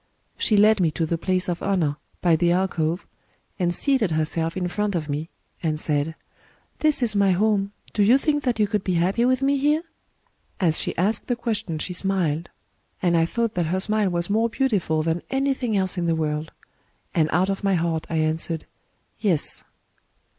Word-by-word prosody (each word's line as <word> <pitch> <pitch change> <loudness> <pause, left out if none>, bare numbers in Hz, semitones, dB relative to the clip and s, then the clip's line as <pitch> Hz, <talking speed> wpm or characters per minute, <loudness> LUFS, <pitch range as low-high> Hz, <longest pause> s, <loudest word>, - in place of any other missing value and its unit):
She 215 - +2
led 210 +1 +5
me 170 -3 +3
to 165 - 0
the 165 +1 -2
place 185 +1 0
of 175 -1 -2
honour, 175 -7 +1 0.3
by 170 -2 +5
the 170 +2 +2
alcove, 175 -2 0 0.5
and 175 -2 +1
seated 260 +1 +1
herself 160 +2 -1
in 180 -1 -1
front 210 +2 -1
of 155 -3 -2
me, 150 +3 -3 0.3
and 155 -2 -1
said: 150 +1 0 0.6
'This 305 -4 +2
is 220 -3 +2
my 200 -2 +4
home: 200 +1 +1 0.2
do 210 - +1
you 225 +6 +6
think 295 +1 0
that 250 -5 0
you 215 - +3
could 205 -1 -1
be 185 - 0
happy 190 +8 +2
with 255 +1 +2
me 280 +1 +3
here? 300 +4 +2 0.4
* - - -42
As 165 -5 +2
she - - -2
asked 205 +5 0
the 245 - +1
question 220 -8 -3
she 180 +4 -4
smiled; 175 -4 -1 0.5
and 175 -2 +2
I 165 0 +3
thought 230 +3 -1
that 175 -2 0
her 185 +3 0
smile 210 0 +2
was 170 -1 -1
more 225 +3 +1
beautiful 200 - 0
than 165 +1 -1
anything 270 -5 0
else 190 -1 0
in 170 - -1
the 165 - +2
world; 155 0 -2 0.6
and 155 -4 +2
out 180 +4 +2
of 195 +1 -2
my 195 -1 +2
heart 165 -2 -1
I 165 - -2
answered, 160 +1 0 0.5
'Yes. 180 -9 +1
185 Hz, 195 wpm, -24 LUFS, 165-215 Hz, 0.6 s, you